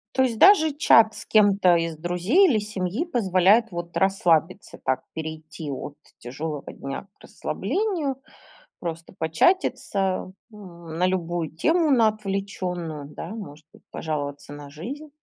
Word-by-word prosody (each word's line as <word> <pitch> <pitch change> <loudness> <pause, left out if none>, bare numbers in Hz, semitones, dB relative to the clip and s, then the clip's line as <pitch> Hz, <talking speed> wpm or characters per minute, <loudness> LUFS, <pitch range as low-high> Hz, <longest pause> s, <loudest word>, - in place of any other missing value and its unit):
То 260 - +4
есть 235 -4 -1
даже 330 -6 +6
чат 225 -7 +5
с - - -8
кем-то 200 -4 +4
из 165 -1 -1
друзей 180 - +3
или 240 - +3
семьи 205 - -3
позволяет 215 - +3
вот 175 0 -6
расслабиться, 185 -1 +1
так 130 0 0
перейти 160 -1 -7
от 140 +1 -6 0.2
тяжелого 145 +4 -6
дня 135 +7 -7
к - - -45
расслаблению. 315 - -2 0.6
Просто 165 -1 -6
початиться, 190 - +1 0.2
м, 170 -6 -10
на 180 - +2
любую 175 -3 -2
тему, 320 - +2
на 235 -4 +5
отвлечённую, 195 -7 -4
да. 150 - -8
Может 170 -9 -9
быть, - - -20
пожаловаться 145 -2 -4
на 145 -1 -10
жизнь. 270 - -8
185 Hz, 135 wpm, -24 LUFS, 160-225 Hz, 0.6 s, даже